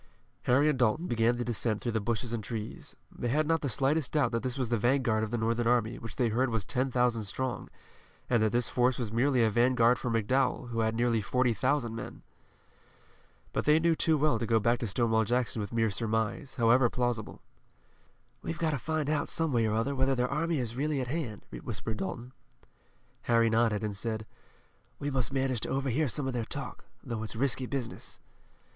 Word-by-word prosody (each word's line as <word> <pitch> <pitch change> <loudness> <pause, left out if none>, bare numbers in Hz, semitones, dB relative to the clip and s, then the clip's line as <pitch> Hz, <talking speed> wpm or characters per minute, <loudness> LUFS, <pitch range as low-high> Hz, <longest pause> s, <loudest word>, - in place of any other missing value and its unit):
Harry 140 +5 +4
and 150 -4 +1
Dalton 125 +8 +2
began 120 -3 +2
the 120 - -2
descent 115 -2 0
through 120 - -2
the 110 - 0
bushes 115 +2 -2
and 115 -2 -3
trees. 110 +1 -6 0.2
They 120 - -4
had 150 +6 +2
not 165 +1 +1
the 140 - -1
slightest 135 +5 0
doubt 140 -6 +2
that 115 -1 -1
this 130 0 -3
was 130 -4 -1
the 120 - +2
vanguard 120 -2 +2
of 110 - -2
the 120 - -1
Northern 115 +1 0
army 120 -1 +1
which 115 -3 -7
they 120 -2 +1
heard 125 +4 +1
was 115 -4 -1
ten 130 +2 0
thousand 125 -3 +1
strong, 130 +5 -3 0.6
and 120 -3 +2
that 110 -1 +2
this 120 0 +1
force 125 +1 +2
was 120 -5 -3
merely 125 +1 +2
a 110 - +4
vanguard 120 +1 +4
for 125 - -2
McDowell, 125 +3 +1
who 115 -1 -3
had 110 0 +1
nearly 115 -1 +2
forty 125 +2 +1
thousand 120 +2 0
men. - - -8 1.3
But - - -1
they 150 +1 +5
knew 165 +1 +3
too 160 0 +2
well 145 -6 +2
to 115 - -2
go 115 -1 +3
back 120 +2 +2
to 115 - -2
Stonewall 110 +1 +2
Jackson 120 0 0
with 100 - -5
mere 115 -2 +1
surmise, 115 +5 -2
however 120 0 +4
plausible. 120 -4 -2 1.0
"We've 80 - -4
got 160 -1 0
to 145 - -2
find 155 +1 -2
out 150 -1 0
some 165 -3 0
way 115 -2 +3
or 110 - 0
other 115 +6 0
whether 135 0 +1
their 125 0 +1
army 165 +3 0
is 125 -4 -1
certainly 140 +4 -1
at 125 -2 -3
hand," 130 -9 -4
whispered 110 -1 -5
Dalton. 115 +6 -5 1.0
Harry 115 -1 +4
nodded, 110 -2 +2
and 105 -2 -2
said: 110 +1 -3 0.7
"We 145 0 -3
must 130 -2 0
manage 135 -3 0
to - - -4
overhear 135 +2 0
some 135 +3 0
of 130 - -2
their 120 -2 -1
talk, 130 +1 -6 0.2
though 115 -4 -4
it's 110 0 -5
risky 130 +1 0
business." 125 -4 -5
120 Hz, 210 wpm, -30 LUFS, 115-135 Hz, 1.3 s, they